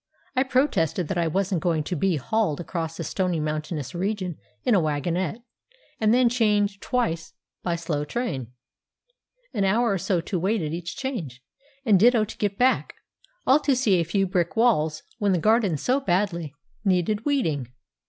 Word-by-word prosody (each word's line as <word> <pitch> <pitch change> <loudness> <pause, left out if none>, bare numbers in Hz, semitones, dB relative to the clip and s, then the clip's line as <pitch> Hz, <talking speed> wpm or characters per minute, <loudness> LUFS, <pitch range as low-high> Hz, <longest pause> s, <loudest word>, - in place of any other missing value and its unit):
I 255 - +3
protested 255 - +1
that 195 - -1
I 170 - +1
wasn't 185 +1 0
going 165 -3 +1
to 180 - -3
be 180 +2 +1
hauled 160 - 0
across 165 -1 -4
a - - -2
stony 180 0 -1
mountainous 150 0 -3
region 185 -2 -2 0.2
in - - +3
a 200 - +5
wagonette, 170 - -1 0.6
and 215 -1 +3
then 250 +1 +5
change 210 -4 +2
twice 170 -11 -1 0.3
by 175 -2 -1
slow 165 -3 -2
train, 150 - -3 1.1
an 205 -4 0
hour 225 +4 +2
or 195 - 0
so 180 +1 0
to 175 +2 -3
wait 195 +2 0
at 150 0 -3
each 170 0 -5
change, 170 - -5 0.4
and 205 -5 +5
ditto 230 +1 +5
to 215 - -10
get 200 -1 -1
back, 255 +1 +2 0.5
all 270 +3 +6
to 285 -3 +2
see 215 -8 +3
a - - +2
few 195 +4 +1
brick 180 -2 -1
walls, 160 -10 +2 0.2
when 205 -3 +2
the - - +2
garden 210 -2 +3
so 255 - +1
badly 175 - -1 0.3
needed 195 +2 +1
weeding. 165 - 0
190 Hz, 175 wpm, -25 LUFS, 165-220 Hz, 1.1 s, all